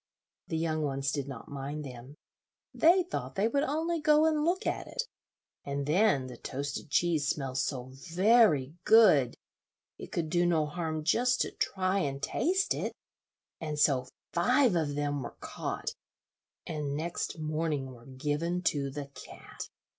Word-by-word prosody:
The 160 - -2
young 160 -1 0
ones 135 -1 -1
did 140 -2 -3
not 130 -4 -8
mind 145 +2 -5
them. 125 +2 -10 0.6
They 355 +3 +5
thought 360 - -5
they 200 +2 +2
would 280 +5 +1
only 320 +3 -1
go 300 +1 +5
and 310 -2 +2
look 350 +4 0
at - - -2
it, - - -2 0.6
and 140 0 -3
then 160 -3 +3
the 125 -2 -9
toasted 140 +4 -5
cheese 160 -3 +2
smelled 135 -3 -1
so 130 -1 -2 0.2
very 180 - +4
good, 175 - +6 0.6
it - - -9
could 160 -2 -2
do 175 0 +3
no 160 -3 +2
harm 155 0 -3
just 250 +10 +2
to - - 0
try 190 0 0
and 140 -6 -2
taste 360 - +1
it; - - -3 0.7
and 155 -2 -4
so 135 -4 +3 0.3
five 245 +5 +3
of 150 -4 0
them 145 -1 -1
were - - -7
caught, - - -4 0.7
and 150 -3 -3
next 170 +2 -3
morning 155 -3 -2
were 120 0 -15
given 150 +6 -2
to 140 -4 +1
the 145 +1 -5
cat. 140 - -10
155 Hz, 155 wpm, -30 LUFS, 140-195 Hz, 0.7 s, good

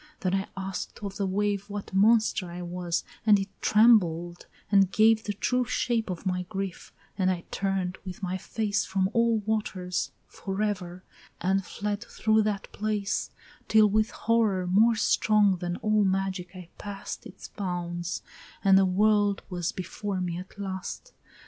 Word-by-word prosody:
Then 185 -2 0
I 195 0 0
ask'd 190 0 -5
of 200 -1 -5
the 200 - 0
wave, 205 +1 -1
What 205 -1 -6
monster 210 -2 +3
I 175 +1 -6
was, 175 -1 -2 0.2
and 210 -2 +6
it 195 0 -3
trembled 175 -7 +3 0.2
and 195 -2 +5
gave 220 +1 +4
The 205 - -1
true 250 +5 +1
shape 230 -1 0
of 180 +1 -5
my 180 -1 0
grief, 195 -3 -5 0.3
and 185 -1 +3
I 175 -2 -1
turn'd 190 -2 -1
with 185 0 -8
my 185 0 -1
face 200 +1 -1
From 190 0 0
all 230 -1 +3
waters 200 -4 -2
forever, 190 -3 -3 0.4
and 195 +1 +1
fled 205 +3 -4
through 220 -1 +2
that 210 -2 -2
place, 210 -1 -1 0.4
Till 215 -1 +5
with 215 +1 +2
horror 220 -5 +1
more 215 +6 +4
strong 210 -2 +3
than 175 0 -3
all 215 -1 +3
magic 190 -1 -1
I 180 -2 -10
pass'd 200 -1 -6
Its 190 - -11
bounds, 175 -3 -4 0.4
and 195 -1 +6
the 190 - +4
world 205 +1 +2
was 175 -1 -1
before 190 +2 -4
me 175 -1 -2
at 185 +3 -11
last. 195 - -6
195 Hz, 155 wpm, -27 LUFS, 185-210 Hz, 0.4 s, and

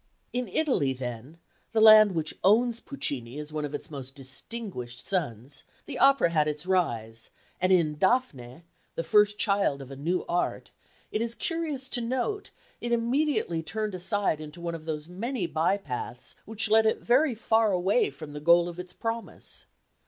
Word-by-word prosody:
In 250 0 -1
Italy 190 - +1
then, 125 +4 -7 0.4
the 225 - +3
land 215 -2 +8
which 160 -2 -2
owns 235 +4 +4
Puccini 135 - -5
as 150 0 -7
one 155 -1 -2
of 145 0 -5
its 145 - -8
most 135 -2 -7
distinguished 135 - -6
sons, 140 - -3 0.2
the - - -6
opera 275 -10 +5
had 155 -2 +2
its 150 +2 -3
rise; 115 -12 -1 0.3
and 185 +1 +3
in 160 -5 +3
Dafne, 170 - 0 0.3
the 165 - -2
first 210 +5 +4
child 200 -10 +1
of 135 -1 -10
a - - -7
new 170 +7 -1
art, 175 +1 -2 0.4
it 215 - -1
is 235 0 -1
curious 310 -5 -2
to 245 - 0
note, 260 - -2 0.3
it 240 - -3
immediately 235 - +1
turned 215 +6 -3
aside 185 -3 0
into 155 +2 -9
one 170 0 -4
of 160 -1 -7
those 155 -1 -4
many 210 +4 -3
by 165 +4 +1
paths 125 -7 -6
which 220 0 0
led 220 0 +6
it 220 - 0
very 255 +2 +3
far 220 -1 +2
away 190 +5 +2
from 145 +2 -10
the 150 - -5
goal 170 +3 +5
of 175 0 -7
its 180 0 -8
promise. 230 0 -5
180 Hz, 175 wpm, -28 LUFS, 150-225 Hz, 0.4 s, land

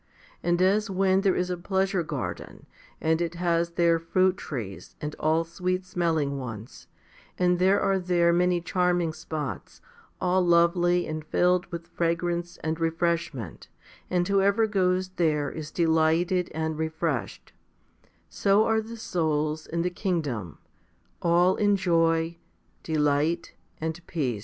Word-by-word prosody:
And 175 0 +1
as 205 +3 +2
when 190 0 +2
there 195 -2 +2
is 180 0 -1
a 180 - -2
pleasure 190 +1 0
garden, 160 - -6 0.3
and 160 +1 +1
it 170 0 -2
has 170 -1 0
there 170 -1 +3
fruit 185 +3 +2
trees, 115 - -7
and 150 0 -5
all 160 +2 +2
sweet 180 +2 -3
smelling 160 -6 -1
ones, 115 -3 -8 0.5
and 180 -1 +2
there 190 +2 +4
are 195 -1 +1
there 175 -1 +2
many 180 0 +2
charming 175 -2 +1
spots, 155 -2 -6 0.4
all 185 0 +2
lovely 175 +1 +3
and 155 0 -5
filled 180 +3 +2
with 170 -1 -7
fragrance 170 +1 -2
and 160 +1 -2
refreshment, 165 - -2 0.4
and 180 -1 +1
whoever 200 +2 +3
goes 185 -3 +1
there 150 -4 +1
is 155 -1 -6
delighted 165 +2 +2
and 160 0 -3
refreshed; 160 -4 -3 0.7
so 200 +2 +2
are 220 0 +2
the 230 +1 -9
souls 155 -5 -1
in 170 +1 -2
the 180 - -1
kingdom, 150 - -3 0.6
all 175 +2 +3
in 205 -1 +3
joy, 165 -2 +1 0.4
delight, 155 +2 0 0.3
and 160 +2 -4
peace. 130 - -2
170 Hz, 135 wpm, -26 LUFS, 160-180 Hz, 0.7 s, there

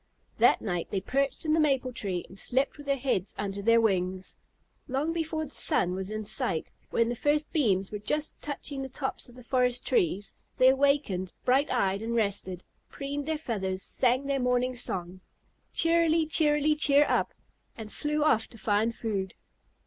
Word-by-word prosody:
That - - +4
night 175 -5 -2
they 195 - -1
perched 275 - -1
in 310 - +2
the 325 - +3
maple 270 -4 +1
tree 190 -6 -3
and 190 - -14
slept 260 +9 +1
with 290 - -11
their 275 0 +1
heads 245 -8 -1
under 200 -1 -3
their 230 +3 +4
wings. 185 -3 -1 0.5
Long 285 +4 -1
before 320 -1 -2
the 285 - -11
sun 180 -9 +3
was 190 +1 -4
in 215 0 -4
sight, 195 -5 -2 0.2
when 230 - +2
the 240 - -2
first 295 +4 0
beams 200 - +1
were 210 - -4
just 300 +8 -2
touching 285 -1 -4
the 265 - -5
tops 265 0 -4
of 245 - -14
the 250 - -12
forest 250 0 +1
trees, 330 - 0 0.2
they 255 - +6
awakened, 270 -9 +1
bright 270 +4 +3
eyed 195 +1 0
and 230 +1 -3
rested, 195 -4 -1 0.3
preened 280 +1 -5
their 315 -1 0
feathers, 190 -10 -3
sang 255 +2 +1
their 275 -1 0
morning 250 0 +1
song, 185 -6 -4 0.5
"Cheerily, 330 -1 +3
cheerily, 300 -1 +3
cheer 295 -1 +5
up," - - 0 0.4
and 220 -2 -8
flew 300 0 -1
off 225 -7 +3
to 230 - -14
find 220 +2 0
food. 200 -4 -3
250 Hz, 180 wpm, -28 LUFS, 200-290 Hz, 0.5 s, they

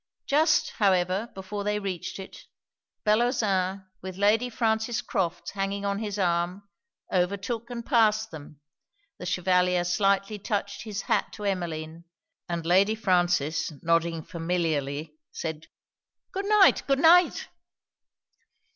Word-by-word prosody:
Just, 305 +4 +3
however, 190 +1 +1
before 195 +2 -5
they 210 +1 0
reached 195 -4 -4
it, 190 -1 -10 0.6
Bellozane, 210 -4 +1 0.2
with 185 0 -7
Lady 215 +5 +3
Frances 220 -1 0
Crofts 175 -2 -2
hanging 200 0 -3
on 200 0 -1
his 210 -2 -4
arm, 180 +1 -1 0.5
overtook 200 +6 -1
and 235 -1 -6
passed 220 -2 +3
them: 150 -1 -11 0.6
the 180 - -6
Chevalier 180 0 +2
slightly 195 +3 +1
touched 200 +1 -3
his 210 -2 -4
hat - - 0
to 210 - -8
Emmeline; 170 -4 -3 0.4
and 170 -1 -3
Lady 195 +5 +4
Frances, 175 -8 +1
nodding 165 -1 +1
familiarly, 155 -3 -2
said 160 -1 -5 0.7
'Good 390 +1 -3
night! 420 -2 +6
good 275 -1 +3
night!' 335 +4 +5
195 Hz, 120 wpm, -27 LUFS, 175-215 Hz, 0.7 s, night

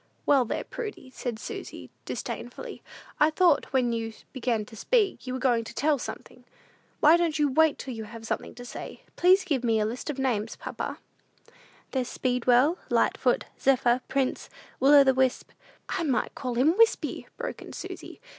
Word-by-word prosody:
"Well, 275 -3 +4
there, - - -3
Prudy," 420 - -7
said 245 -3 -4
Susy, - - -8
disdainfully, - - -6 0.4
"I 300 - +6
thought, 325 -2 +3
when 250 -3 +2
you 225 -1 -3 0.2
began 235 -4 -1
to 225 - -13
speak, 410 - +1
you 255 - -2
was 260 - -4
going 240 -3 +2
to - - -10
tell 290 0 +2
something! 250 +1 -8 0.6
Why 315 +3 +7
don't 335 -3 0
you 295 -2 +2
wait 315 +2 +4
till 260 - -6
you 220 -1 -6
have 225 +1 -10
something - - -4
to 245 - -9
say? - - -8
Please 370 +2 +5
give 285 -9 -1
me 225 -2 +2
a 210 - +1
list 240 +7 -4
of 290 - -3
names, 230 -5 -1
papa." - - -5 0.9
"There's 255 -2 -1
Speedwell, 250 +6 +2
Lightfoot, - - +2
Zephyr, 250 -2 +3
Prince, 270 -2 -1 0.3
Will 275 +3 +6
o' 285 - +9
the 265 -1 +4
wisp 260 -1 0 0.2
" - - -32
"I 380 - -1
might 280 -7 0
call 250 -3 -4
him 290 +8 +3
Wispy," 455 0 +2
broke - - -5
in - - -10
Susy. - - -8
260 Hz, 180 wpm, -27 LUFS, 240-300 Hz, 0.9 s, o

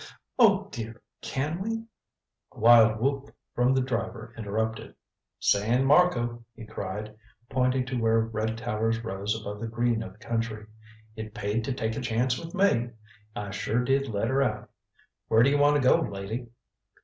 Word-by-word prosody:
"Oh, 205 -4 +5
dear 115 -1 -6 0.2
can 150 +6 -2
we" 225 +2 -2 0.7
A - - -14
wild 115 -1 +6
whoop 140 +3 -2 0.2
from 125 +2 +2
the 130 - +3
driver 115 -2 -4
interrupted. 110 +1 -3 0.4
"San 115 +6 +2
Marco," 120 -7 +3
he 115 - -10
cried, 105 +1 -6 0.4
pointing 130 0 +1
to 125 -1 -3
where 115 0 +3
red 110 0 -2
towers 115 0 -1
rose 105 0 -2
above 105 -1 -7
the 115 - -4
green 115 0 0
of 95 -4 -7
the - - -22
country. 115 -1 -3 0.5
"It 110 -1 -7
paid 105 +3 -1
to 135 - -2
take 110 -3 -2
a - - -3
chance 125 +1 0
with 170 +3 -8
me. 180 -12 +2 0.5
I 100 -1 -5
sure 110 +4 -1
did 135 +2 +1
let 110 0 -1
her 135 +1 +2
out. 135 - -2 0.6
Where 110 +1 +5
do 135 - +4
you 145 - +2
want 145 +1 +5
to 130 - +2
go, - - +6
lady?" 105 +5 -4
115 Hz, 170 wpm, -27 LUFS, 110-130 Hz, 0.7 s, wild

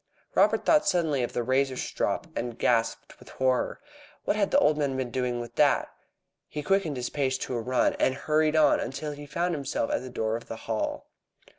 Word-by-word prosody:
Robert - - +3
thought 305 -1 +4
suddenly 160 - +2
of 120 - -2
the 120 - -1
razor 130 +1 +1
strop, - - -2
and 120 -1 -3
gasped 115 -2 0
with - - -15
horror. 130 -1 0 0.5
What - - +1
had 205 -2 +1
the - - +3
old 155 - +4
man 140 -3 0
been 130 -2 -3
doing 125 -1 -1
with 120 0 -7
that? - - +3 0.6
He 150 - -5
quickened 195 -6 +1
his 125 -1 -3
pace 135 -2 0
to 130 - -4
a 120 - -1
run, 125 +2 +1
and 130 - +2
hurried 155 +2 +1
on 155 -1 +5
until 135 +5 -4
he 145 0 -9
found 170 +4 -1
himself 140 -6 -2
at - - 0
the 130 - -7
door 110 -2 -1
of 115 - -7
the - - -5
Hall. 110 -1 -2
130 Hz, 205 wpm, -27 LUFS, 125-155 Hz, 0.6 s, on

